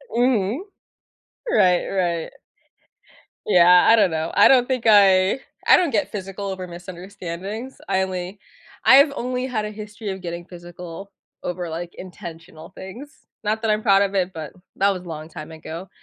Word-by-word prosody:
Mhm. 240 - +1 0.9
Right, 185 - +3
right. 175 -4 -1 1.2
Yeah, 180 -2 +6
I 230 - +7
don't 200 -4 +4
know. 160 0 -2
I - - +7
don't 255 -2 +5
think 255 -3 -1
I 195 +1 +5 0.3
I - - +8
don't 345 -5 +1
get 295 - 0
physical 195 0 -6
over 190 -1 -5
misunderstandings. 185 +5 -8
I 190 -1 +2
only 185 +1 -4 0.5
I've 280 +2 +7
only 250 +1 -2
had 220 -5 -2
a 210 - -4
history 210 0 -7
of 190 -1 -6
getting 170 0 -6
physical 175 +2 -10 0.3
over, 175 -1 -4
like, 170 +2 -6
intentional 170 -2 -10
things. 235 +11 -11 0.2
Not 215 +1 0
that 225 - +1
I'm 215 0 +1
proud 200 -2 +5
of 200 0 -1
it, 185 -1 0
but 160 -3 -7 0.2
that 195 - +3
was 185 -2 -4
long 155 -1 -7
time 155 0 -9
ago. 165 +3 -8
190 Hz, 160 wpm, -22 LUFS, 175-215 Hz, 1.2 s, I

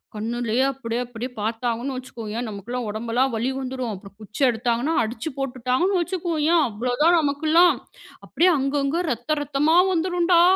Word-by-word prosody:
கண்ணுலயே 235 +3 -1
அப்டீயே 240 -3 -4
அப்டீயே 245 +1 -6
பாத்தாங்கன்னு 235 +4 -2
வச்சுக்கோயென், 235 -2 -5
நமகெல்லாம் 225 +4 -5
ஒடம்பெல்லாம் 235 +4 0
வலி 230 +3 0
வந்துரும். 255 -3 -4
அப்புறம் 195 +1 -13
குச்சி 215 +4 -9
எடுத்தாங்கன்னா, 240 +5 0
அடிச்சு 230 +6 -4
போட்டுட்டாங்கன்னு 270 +8 0
வச்சுக்கோயென், 340 -2 +1
அவ்வளோதான் 250 +10 +2
நமக்கெல்லாம் 315 +4 +4 0.5
அப்டீயே 360 +2 +3
அங்கங்க 275 +4 0
ரத்தம் 250 +6 -1
ரத்தமா 295 +3 +2 0.2
வந்துரும் 350 0 0
டா" 340 - +7
255 Hz, 130 wpm, -23 LUFS, 230-310 Hz, 0.5 s, டா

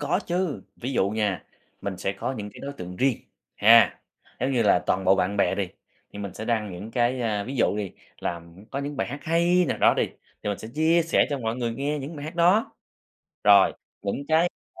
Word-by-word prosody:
có 150 +6 0
chứ, 175 -3 -1
ví 130 +3 -4
dụ 95 -6 +2
nha, 105 -5 -1 0.4
mình 100 -2 -4
sẽ 95 - -1
có 100 +6 -3
những 105 -5 -6
cái - - -12
đối 140 - -5
tượng 90 -8 -8
riêng, 130 0 +2 0.4
ha. 115 +2 +6 0.4
Giống 130 +3 0
như 120 -3 +2
là, 100 -4 +5
toàn 95 +1 +1
bộ 95 - +6
bạn 95 +1 0
bè 100 - +2
đi, 100 -3 -2 0.4
thì - - -9
mình 100 -2 -6
sẽ 110 - -6
đăng 110 -4 -1
những 95 +5 -8
cái, 120 +1 +1
a, 105 -4 -1
ví 135 +4 -5
dụ 110 - +2
đi 100 -4 -3 0.3
là 85 -1 -3 0.3
có 135 - -3
những 140 +1 -4
bài - - -1
hát 140 +4 -6
hay 170 +2 +3
nào - - -1
đó - - +5
đi, - - +2 0.4
thì - - -3
mình 100 - -2
sẽ 110 - -8
chia 160 +2 +3
sẻ 165 - +3
cho 140 - -1
mọi 115 -1 -2
người 120 -2 -2
nghe 145 +4 -2
những 145 +4 -6
bài 145 - -7
hát 155 +4 -6
đó. 180 +6 +3 0.7
Rồi, 100 -2 +7 0.3
những 105 +8 -3
cái 160 +2 +4 0.3
mà - - -13
120 Hz, 235 wpm, -25 LUFS, 100-145 Hz, 0.7 s, Rồi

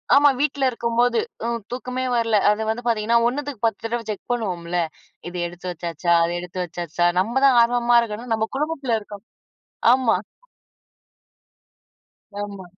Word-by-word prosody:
ஆமா. 290 +1 +7
வீட்டுல 285 -2 0
இருக்கும்போது 240 - +1 0.3
அ - - 0 0.2
தூக்கமே 250 +1 -3
வரல, 230 -2 +2
அது 210 +1 -1
வந்து 230 +2 -2
பாத்தீங்கன்னா 230 0 +2
1 260 +5 -1
த்துக்கு 275 -7 -7
10 225 -3 0
தடவ 235 +1 -2
செக் 210 - -6
பண்ணுவோம்ல, 180 -7 -2 0.5
இது 180 - -7
எடுத்து 175 +1 -8
வெச்சாச்சா, 170 0 -3
அத 170 - 0
எடுத்து 180 +1 -7
வச்சாச்சா, 175 0 -1
நம்ம 220 +6 -1
தான் 265 -3 +6
ஆர்வமா 240 0 +3
இருக்கோன்னா, 230 +1 -5
நம்ம 220 0 -1
குடும்பத்துல 280 -6 -1
இருக்கோம் 205 -1 -11 0.7
ஆமா. 255 -6 +2 2.2
ஆமா. 200 -2 -7
225 Hz, 140 wpm, -22 LUFS, 185-245 Hz, 2.2 s, ஆமா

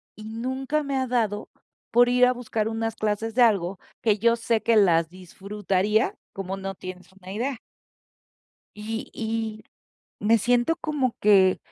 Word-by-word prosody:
Y 215 - -11
nunca, 260 +6 -2
me 275 -1 -2
ha 260 -1 0
dado 220 -4 -1 0.4
por 245 +1 +5
ir 250 0 +5
a 250 - +3
buscar 225 -3 -2
unas 225 0 -2
clases 215 +1 -2
de 250 - +2
algo, 195 -5 +3 0.2
que 215 -3 +2
yo 235 +1 +4
sé 230 -2 0
que 230 0 +2
las 170 -5 +4
disfrutaría 195 +3 -1 0.2
como 195 0 -4
no 195 0 -5
tienes 185 0 -9
una 190 -1 -11
idea. 245 +4 -3 1.2
Y 220 +2 -5
y 220 -1 -3 0.6
me 225 +1 +5
siento, 245 +8 +2
como 280 -6 -1
que. 195 -3 +5
220 Hz, 155 wpm, -25 LUFS, 195-240 Hz, 1.2 s, por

